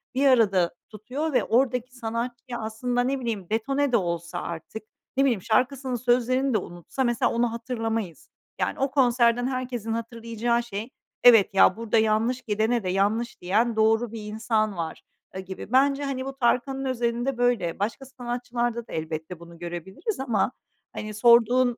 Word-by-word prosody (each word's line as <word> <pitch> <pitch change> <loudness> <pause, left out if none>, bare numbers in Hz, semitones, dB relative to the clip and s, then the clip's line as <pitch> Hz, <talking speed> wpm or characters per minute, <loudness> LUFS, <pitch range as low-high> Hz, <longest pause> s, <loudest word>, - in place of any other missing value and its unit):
bir 275 +2 +2
arada 195 -9 +4 0.2
tutuyor 255 +9 -4
ve - - +3
oradaki 250 +1 +1
sanatçıyı 240 +1 -4
aslında, 235 +3 -2
ne 265 +2 0
bileyim, 220 -7 -4
detone 275 +6 0
de 235 - +5
olsa 170 -3 -3
artık, 170 +6 -7 0.3
ne 275 - +5
bileyim, 235 -8 +1
şarkısının 255 +4 0
sözlerini 250 +2 +1
de - - +4
unutsa 175 +7 -4
mesela 240 -2 +1
onu 235 0 +1
hatırlamayız. 225 -6 -4 0.3
Yani, - - -1
o 270 0 0
konserden 245 -2 +3
herkesin 250 -4 -3
hatırlayacağı 230 0 -2
şey: 225 0 -6 0.3
"Evet 225 -5 +7
ya, 190 0 +5
burada 230 0 0
yanlış 220 +3 +2
gidene 220 0 0
de 185 - -2
yanlış 205 +6 0
diyen 220 +6 +1
doğru 220 +1 +2
bir 225 -1 -6
insan 215 -1 -1
var." 165 -1 -4 0.3
aaa, - - -4
gibi. 190 +3 -8
Bence, 275 +2 +3
hani, 265 -2 -3
bu 270 0 -6
Tarkan'ın 265 +2 +1
özelinde 240 0 -1
böyle. 240 -9 +1
Başka 225 +6 -2
sanatçılarda 240 -2 -3
da - - -10
elbette 160 +2 -5
bunu 170 0 -13
görebiliriz 175 - -5
ama, 245 -3 +1 0.4
hani, 215 0 -5
sorduğun, 240 +2 +4
235 Hz, 155 wpm, -25 LUFS, 215-250 Hz, 0.4 s, Evet